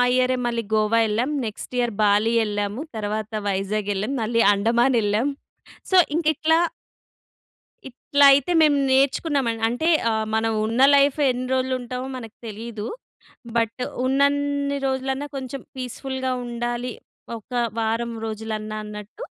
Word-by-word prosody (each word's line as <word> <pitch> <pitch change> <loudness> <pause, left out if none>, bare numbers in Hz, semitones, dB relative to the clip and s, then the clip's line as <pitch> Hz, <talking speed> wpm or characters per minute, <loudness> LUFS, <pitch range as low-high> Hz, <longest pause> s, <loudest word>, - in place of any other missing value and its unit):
ఇయరే 255 0 +2
మళ్ళీ 235 -1 -1
గోవా 215 +1 +3
ఎళ్ళాం, 230 +6 0 0.2
నెక్స్ట్ 215 +3 -7
ఇయర్ 240 -3 0
బాలి 210 +2 +3
ఎళ్ళాము, 205 +4 -3
తర్వాత 215 0 -3 0.2
వైజాగ్ 200 +1 -1
ఎళ్ళాం, 210 +7 -2
మళ్ళీ 230 +1 +1
అండమాన్ 235 +5 +2
ఎళ్ళాం. 215 +7 +1 0.6
సో, 375 - +4 0.2
ఇంక 330 0 -1
ఇట్లా... 320 +2 +3 1.3
ఇట్లైతే 280 +3 +4
మేము 295 -2 +5
నేర్చుకున్నామ. 275 0 +2 0.2
అంటే 245 +8 -1 0.2
ఆహ్, 220 0 0
మనం 225 0 +1
ఉన్న 230 +4 0
లైఫ్ 280 +1 +4
ఎన్ని 250 0 -2
రోజులు 260 0 0
ఉంటామో 250 +2 -5
మనకు 225 -3 -10
తెలీదు. 220 0 -6 0.7
బట్, 230 +2 -1 0.2
ఉన్నన్ని 280 +1 +1
రోజులున్నా 265 +2 -2
కొంచెం 265 0 -6
పీస్‌ఫుల్‌గా 260 +1 -4
ఉండాలి. 240 +1 -3 0.4
ఒక 220 - -18 0.3
వారం 230 +1 -1
రోజులన్నా 215 -1 -4
అన్నట్టు 210 - -9
240 Hz, 125 wpm, -23 LUFS, 220-265 Hz, 1.3 s, మేము